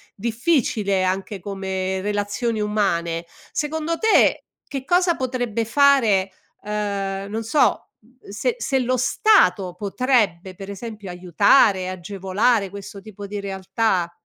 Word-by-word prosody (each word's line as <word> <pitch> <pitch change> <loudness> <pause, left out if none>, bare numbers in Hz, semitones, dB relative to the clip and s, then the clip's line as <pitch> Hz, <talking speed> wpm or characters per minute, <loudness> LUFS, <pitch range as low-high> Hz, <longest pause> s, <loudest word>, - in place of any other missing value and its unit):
difficile 225 - 0
anche 190 +2 -2
come 190 0 -3
relazioni 205 +3 -2
umane, 170 -6 -1 0.3
secondo 315 +2 -2
te 445 -1 +3 0.2
che 275 -2 -5
cosa 355 +2 +2
potrebbe 245 -3 -2
fare 230 -7 +3 0.3
ehm, 200 -2 -3
non 225 +1 -3
so, 265 +7 +1
mhmm, 245 0 -21
se 450 - -1
se 270 -2 0
lo 255 +1 0
Stato 245 - +3
potrebbe 200 -4 0
per 195 +1 -9
esempio 205 -1 -7
aiutare, 185 - +3
agevolare 195 +3 0
questo 200 0 -9
tipo 205 -1 -10
di 205 +1 -5
realtà. 190 -2 -1
205 Hz, 120 wpm, -22 LUFS, 190-245 Hz, 0.3 s, te